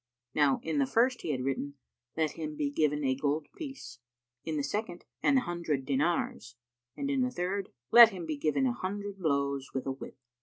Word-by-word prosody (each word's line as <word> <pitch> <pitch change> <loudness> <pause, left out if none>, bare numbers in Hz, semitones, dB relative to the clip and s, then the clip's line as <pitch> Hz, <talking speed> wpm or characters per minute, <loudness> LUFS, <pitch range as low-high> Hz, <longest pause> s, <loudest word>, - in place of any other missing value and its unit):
Now 145 -3 +3
in 160 -2 -1
the 135 - +2
first 245 - +2
he - - -5
had 130 -4 -1
written, 135 +1 -2 0.4
"Let 160 -1 +1
him 155 -2 -5
be 145 -1 -1
given 150 0 +1
a 130 -1 +2
gold 145 +3 -1
piece," 270 - -8 0.4
in 160 -1 -2
the 145 - 0
second, 190 -1 -3 0.2
"An 280 - +4
hundred 170 - -1
dinars," 140 -3 -1 0.4
and 280 - -2
in 270 -2 +1
the 255 - +2
third, 190 -2 -2 0.2
"Let 235 -1 +11
him 185 -5 -6
be 155 -1 -2
given 145 -2 +1
an 125 - +2
hundred 200 +6 -5
blows 140 -5 -1
with 130 - -2
a 135 - -1
whip." 130 - -9
155 Hz, 195 wpm, -30 LUFS, 140-195 Hz, 0.4 s, Let